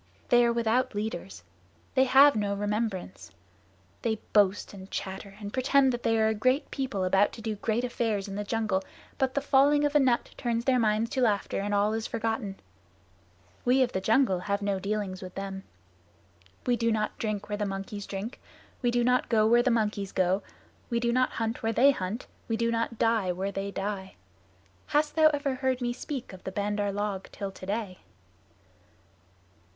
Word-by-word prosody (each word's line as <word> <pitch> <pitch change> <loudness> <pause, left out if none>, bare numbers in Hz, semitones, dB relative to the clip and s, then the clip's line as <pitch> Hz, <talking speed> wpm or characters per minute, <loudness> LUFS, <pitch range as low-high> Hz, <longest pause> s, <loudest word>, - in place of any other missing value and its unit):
They 240 -1 +6
are 235 - +3
without 235 +1 +1
leaders. 170 - -4 0.5
They 265 0 +4
have 275 +2 +7
no 205 -1 0
remembrance. 205 - -3 0.7
They 225 -1 0 0.2
boast 205 -1 +3
and 190 -1 -10
chatter 195 +1 -6
and 205 -1 -7
pretend 265 0 +3
that 240 - -3
they 225 -1 +2
are 220 0 +3
a - - +1
great 255 +7 +1
people 260 -8 -2
about 195 +2 +3
to 225 - -9
do 220 -1 -1
great 220 +3 -1
affairs 225 -5 -1
in 195 - -6
the 205 +1 -3
jungle, 215 -3 -1 0.4
but 265 -2 +1
the 280 - +1
falling 285 +1 +4
of 290 - 0
a 295 - +5
nut 255 -3 +2
turns 235 -1 -1
their 255 -2 +3
minds 220 0 +1
to 265 - -1
laughter 210 -5 +1
and 205 +1 -2
all 205 +2 +2
is 225 0 -2
forgotten. 225 -3 -3 1.0
We 255 +2 +4
of 245 - -1
the 190 - -2
jungle 220 -3 +3
have 200 +2 -2
no 200 -1 0
dealings 200 -1 -3
with 185 -1 -9
them. 195 0 -5 1.0
We 245 - +3
do 230 -1 +1
not 215 -1 -1
drink 215 -2 -2
where 205 0 -3
the 210 - 0
monkeys 195 +1 -5
drink; 200 +5 -6 0.4
we 245 - +2
do 240 0 +2
not 250 +1 +2
go 215 -2 +4
where 235 +2 +5
the 255 - +2
monkeys 210 -4 0
go; 185 +1 +1 0.5
we 235 -1 +1
do 235 0 +1
not 255 0 +2
hunt 225 +1 -2
where 225 0 0
they 275 +5 +6
hunt; 205 0 -4 0.2
we 225 - 0
do 230 0 +1
not 230 0 -1
die 225 -5 +2
where 190 +3 -3
they 195 0 -3
die. 195 -1 -4 0.7
Hast 295 +1 +1
thou 315 -1 +7
ever 290 -2 0
heard 260 -1 0
me 240 -1 -1
speak 260 -3 -6
of 185 - -12
the 190 - -4
Bandar 205 +1 -1
log 200 -1 -3
till 200 -1 -5
today?" 195 0 -4
220 Hz, 190 wpm, -28 LUFS, 200-245 Hz, 1.0 s, have